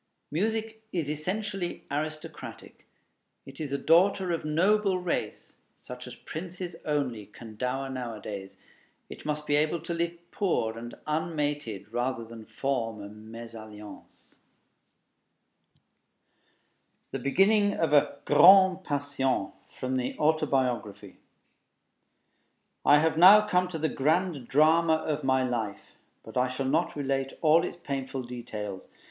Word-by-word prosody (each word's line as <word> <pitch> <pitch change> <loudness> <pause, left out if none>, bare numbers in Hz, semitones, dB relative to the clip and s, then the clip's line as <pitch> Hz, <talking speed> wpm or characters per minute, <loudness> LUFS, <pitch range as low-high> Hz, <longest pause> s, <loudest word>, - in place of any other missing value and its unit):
Music 220 +6 -1
is 165 -5 -2
essentially 185 +3 -3
aristocratic; 155 +2 -6 0.6
it 135 0 -12
is 150 -3 -4
a 140 - 0
daughter 180 +5 +3
of 165 - -2
noble 190 +6 +2
race, 180 -2 -3 0.2
such 125 0 -9
as 125 - -8
princes 175 +1 -7
only 130 -8 -1
can 110 -2 -12
dower 130 +4 -2
nowadays; 110 -6 -6 0.5
it - - -9
must 150 0 -2
be 145 - +2
able 155 +3 +2
to 170 - -5
live 170 0 -2
poor 115 - 0
and 120 +1 -8
unmated 145 - -2
rather 120 -1 -1
than 115 -1 -11
form 115 -5 -2
a 100 - -7
mésalliance. 110 0 -11 2.7
THE - - -3
BEGINNING 200 +8 +3
OF 165 -2 0
A 145 -1 +4
"GRAND 190 0 +7
PASSION" 140 - -1 0.2
From 130 0 -3
the 125 - -3
Autobiography 135 -8 0 1.7
I 145 - +7
have 160 +1 +2
now 210 +4 +9
come 180 -1 +2
to 180 -2 -5
the 160 0 0
grand 155 -1 0
drama 160 +3 +4
of 155 -2 -2
my 130 0 +2
life; 115 -5 -3 0.3
but - - -8
I 125 0 +3
shall 130 +1 -3
not 160 +6 +1
relate 135 -1 -1
all 160 +2 +5
its - - -4
painful 135 -5 -4
details. 105 -5 -7
145 Hz, 125 wpm, -28 LUFS, 125-170 Hz, 2.7 s, now